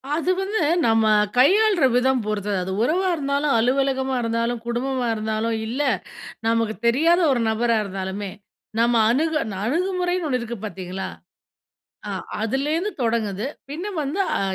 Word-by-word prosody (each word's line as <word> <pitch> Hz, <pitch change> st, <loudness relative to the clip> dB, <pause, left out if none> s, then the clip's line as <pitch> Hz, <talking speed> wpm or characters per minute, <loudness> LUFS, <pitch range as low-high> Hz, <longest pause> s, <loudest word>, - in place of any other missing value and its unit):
அது 340 Hz, +3 st, +1 dB
வந்து, 390 Hz, 0 st, -1 dB, 0.3 s
நம்ம 225 Hz, -1 st, +3 dB, 0.3 s
கையாள்ற 385 Hz, +3 st, +5 dB
விதம் 255 Hz, 0 st, +3 dB
பொறுத்தது. 205 Hz, -2 st, -1 dB
அது 190 Hz, -, -4 dB
உறவா 360 Hz, +9 st, +1 dB
இருந்தாலும், 280 Hz, -1 st, 0 dB
அலுவலகமா 265 Hz, +1 st, +1 dB
இருந்தாலும், 230 Hz, +1 st, -1 dB
குடும்பமா 245 Hz, +1 st, -1 dB
இருந்தாலும், 220 Hz, +1 st, -1 dB
இல்ல 255 Hz, +6 st, -2 dB, 0.7 s
நமக்கு 230 Hz, -1 st, +1 dB
தெரியாத 330 Hz, +9 st, +4 dB
ஒரு 250 Hz, -, +1 dB
நபரா 230 Hz, +1 st, +1 dB
இருந்தாலுமே 190 Hz, 0 st, -4 dB, 0.5 s
நம்ம 235 Hz, +1 st, +3 dB
அணுக 315 Hz, +6 st, +1 dB, 0.3 s
அணுகுமுறைன்னு 360 Hz, +4 st, 0 dB
ஒன்னு 255 Hz, -3 st, 0 dB
இருக்கு 235 Hz, 0 st, -5 dB
பார்த்தீங்களா? 190 Hz, -1 st, -5 dB, 1.0 s
ஆ -, -, -3 dB, 0.3 s
அதிலேந்து 295 Hz, -, 0 dB
தொடங்குது. 220 Hz, -2 st, -1 dB, 0.2 s
பின்ன 345 Hz, +8 st, -5 dB
வந்து 300 Hz, +7 st, -2 dB, 0.2 s
அ -, -, -2 dB
250 Hz, 130 wpm, -23 LUFS, 225-310 Hz, 1.0 s, கையாள்ற